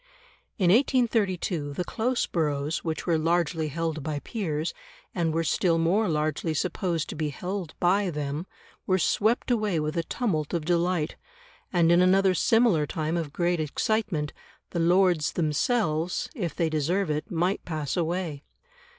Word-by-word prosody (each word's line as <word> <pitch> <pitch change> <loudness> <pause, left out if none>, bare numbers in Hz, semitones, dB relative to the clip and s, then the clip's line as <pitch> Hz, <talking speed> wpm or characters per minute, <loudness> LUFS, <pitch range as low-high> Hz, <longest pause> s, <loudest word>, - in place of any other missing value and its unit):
In 180 -4 +3
1832 205 - +1
the 180 - -2
close 240 +6 -1
boroughs, 150 -2 -1
which 160 -2 -3
were 165 -3 +2
largely 165 -1 +1
held 160 +1 -2
by 150 +1 -3
peers, 160 - -3 0.4
and 170 -3 0
were 165 +1 0
still 165 +1 +2
more 180 +6 +2
largely 155 +1 -1
supposed 175 -1 -1
to - - -5
be 155 -1 -1
held 180 +2 -5
by 190 +2 +2
them, 150 +2 -3 0.4
were 185 - +3
swept 220 +7 +1
away 210 -7 +1
with 155 +2 -2
a 170 - +1
tumult 165 - -2
of 160 -3 -2
delight; 175 -1 0 0.5
and 170 -2 +4
in 175 +1 +5
another 190 +1 +4
similar 210 -6 +3
time 160 +2 -2
of 165 -4 -2
great 175 +2 0
excitement, 160 0 -1 0.4
the 170 - -2
Lords 175 -1 +3
themselves, 165 - 0
if 180 - -3
they 165 - +1
deserve 160 +4 0
it, 150 0 -3
might 175 +3 0
pass 155 -4 -3
away. 170 -3 -2
170 Hz, 150 wpm, -27 LUFS, 155-185 Hz, 0.5 s, in